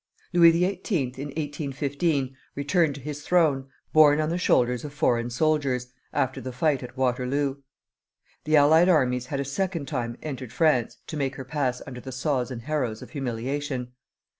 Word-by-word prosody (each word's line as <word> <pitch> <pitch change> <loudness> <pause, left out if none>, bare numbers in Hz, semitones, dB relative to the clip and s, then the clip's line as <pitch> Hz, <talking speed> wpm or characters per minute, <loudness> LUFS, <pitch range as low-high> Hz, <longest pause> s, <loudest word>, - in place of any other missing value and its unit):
Louis 170 -1 +8
XVIII. 175 - 0
in 140 - -4
1815 145 -1 -2 0.2
returned 145 +1 +1
to 140 - -9
his 150 +2 -6
throne, 150 -6 +2 0.3
borne 150 -1 +6
on 155 0 +1
the 170 - -1
shoulders 125 -7 +2
of 145 -1 -8
foreign 120 -4 +1
soldiers, 130 -2 0 0.2
after 130 -2 -1
the 130 - -5
fight 140 +2 +1
at 125 0 -9
Waterloo. 130 +2 0 0.9
The 155 - +3
allied 160 +5 +6
armies 125 -7 +2
had 140 - -3
a 140 - -1
second 170 +1 -2
time 120 -5 -3
entered 130 -6 -5
France 140 -5 +2
to 155 - -6
make 135 -2 -1
her 130 - -7
pass 130 -3 -1
under 125 -1 -8
the 130 - -8
saws 130 -1 -1
and 120 -3 -6
harrows 130 -6 -2
of - - -13
humiliation. 130 0 -3
140 Hz, 165 wpm, -26 LUFS, 125-155 Hz, 0.9 s, Louis